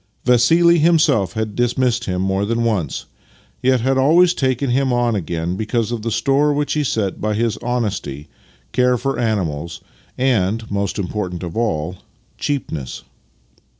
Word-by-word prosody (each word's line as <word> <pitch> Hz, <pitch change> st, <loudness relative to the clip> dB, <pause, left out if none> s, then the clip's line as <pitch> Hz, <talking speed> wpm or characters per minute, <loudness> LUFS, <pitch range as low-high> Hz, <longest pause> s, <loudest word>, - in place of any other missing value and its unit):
Vassili 165 Hz, +8 st, +5 dB
himself 150 Hz, -, +3 dB
had 110 Hz, -1 st, -3 dB
dismissed 120 Hz, -1 st, +1 dB
him 90 Hz, 0 st, -1 dB
more 95 Hz, +1 st, 0 dB
than 115 Hz, +3 st, 0 dB
once, 100 Hz, -11 st, -1 dB, 0.6 s
yet 130 Hz, -1 st, +2 dB
had 135 Hz, +2 st, +1 dB
always 170 Hz, +6 st, +5 dB
taken 130 Hz, -3 st, 0 dB
him 130 Hz, +1 st, +1 dB
on 120 Hz, -1 st, +1 dB
again 85 Hz, -1 st, -2 dB
because 110 Hz, +2 st, -1 dB
of 120 Hz, -2 st, -3 dB
the 115 Hz, -, -2 dB
store 135 Hz, +6 st, +2 dB
which 145 Hz, 0 st, 0 dB
he 150 Hz, -, 0 dB
set 105 Hz, -7 st, -2 dB
by 105 Hz, 0 st, 0 dB
his 115 Hz, 0 st, 0 dB
honesty, 105 Hz, -, -3 dB, 0.4 s
care 125 Hz, 0 st, +2 dB
for 135 Hz, +3 st, -2 dB
animals, 85 Hz, -8 st, -2 dB, 0.4 s
and 115 Hz, -4 st, 0 dB
(most 100 Hz, -1 st, -1 dB
important 90 Hz, -2 st, -3 dB
of 85 Hz, -2 st, -6 dB
all) 90 Hz, -6 st, -1 dB, 0.4 s
cheapness. 80 Hz, -, -3 dB
115 Hz, 150 wpm, -19 LUFS, 95-130 Hz, 0.6 s, Vassili